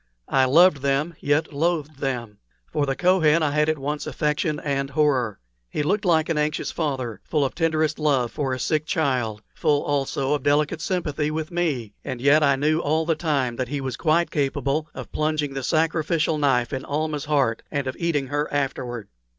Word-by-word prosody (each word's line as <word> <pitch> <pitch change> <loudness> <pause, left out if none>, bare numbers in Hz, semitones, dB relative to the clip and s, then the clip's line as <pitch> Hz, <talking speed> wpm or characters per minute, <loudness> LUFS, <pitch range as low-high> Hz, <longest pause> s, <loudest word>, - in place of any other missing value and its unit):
I 135 -1 +4
loved 165 +5 +6
them, 140 +4 0
yet 150 +2 0
loathed 155 -1 -1
them; 120 -6 -3 0.3
for 145 -1 +1
the 135 - 0
Kohen 170 -3 +3
I 145 - +1
had 150 +1 +2
at 155 - +1
once 145 +2 -3
affection 150 +1 -1
and 140 -1 -1
horror. 135 -7 +1 0.3
He 150 - -2
looked 205 +7 0
like 160 -3 +3
an 160 -2 0
anxious 150 +1 -1
father, 130 - -3
full 150 -3 0
of 135 - -3
tenderest 160 -2 0
love 135 -6 +1
for 140 -3 -2
a 130 - -1
sick 155 +4 -1
child 125 -10 0
full 145 -1 +1
also 140 -1 0
of 145 - 0
delicate 150 +3 +1
sympathy 155 -5 -1
with 155 +2 -3
me; 145 -12 -1
and 130 -3 -5
yet 145 +4 +5
I 140 -2 +4
knew 155 +4 +1
all 160 0 +1
the 165 - +2
time 140 -7 -1
that 130 - -2
he 145 +3 -3
was 130 -3 -3
quite 165 +4 +1
capable 145 +1 -1
of - - -8
plunging 150 -2 -1
the 135 - -3
sacrificial 160 +1 +1
knife 135 -3 +2
in 130 0 -3
Almah's 150 0 -2
heart 140 -7 +1
and 140 -2 -2
of 130 - -3
eating 165 -5 0
her 145 +3 -2
afterward. 125 -5 -2
145 Hz, 190 wpm, -24 LUFS, 135-155 Hz, 0.3 s, loved